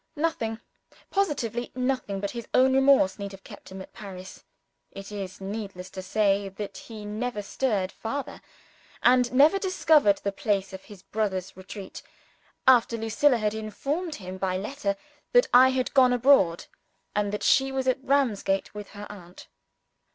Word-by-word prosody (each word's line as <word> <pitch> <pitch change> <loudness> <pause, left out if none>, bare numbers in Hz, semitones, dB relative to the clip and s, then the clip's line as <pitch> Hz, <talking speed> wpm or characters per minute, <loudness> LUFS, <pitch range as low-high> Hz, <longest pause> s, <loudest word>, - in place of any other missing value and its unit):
Nothing, 240 -8 -2 0.5
positively 245 - -1
nothing, 255 -6 -1
but 200 0 -3
his 235 -1 -7
own 260 +1 +5
remorse 265 -8 +4
need 200 -1 -5
have 195 0 -12
kept - - -12
him 190 0 -7
at - - -17
Paris 190 -2 -10 0.5
(it 195 +1 -10
is 195 -3 -6
needless 195 -2 -6
to 190 - -6
say 200 0 +1
that 195 +1 -7
he 215 -2 -9
never 210 +1 -3
stirred 200 -3 -1
farther, 275 +5 -5 0.6
and 250 0 +4
never 295 +9 +5
discovered 315 - +3
the 200 - 0
place 195 -1 -1
of 190 - -9
his 200 -3 -13
brother's 195 -4 -3
retreat) 190 +1 -9 0.7
after 240 -2 +5
Lucilla 225 +4 +2
had 215 -1 -1
informed 280 - -3
him 185 -3 -8
by 185 -1 0
letter, 210 0 -2 0.4
that - - +6
I 255 +1 +8
had 260 -1 -1
gone 255 -2 +5
abroad, 240 -9 +4 0.5
and 205 -1 0
that 210 - -4
she 270 0 +3
was 265 -1 -2
at 260 +1 +1
Ramsgate 230 -9 +1
with 210 -1 -8
her 205 - -6
aunt. 180 -3 -12
215 Hz, 160 wpm, -26 LUFS, 195-260 Hz, 0.7 s, I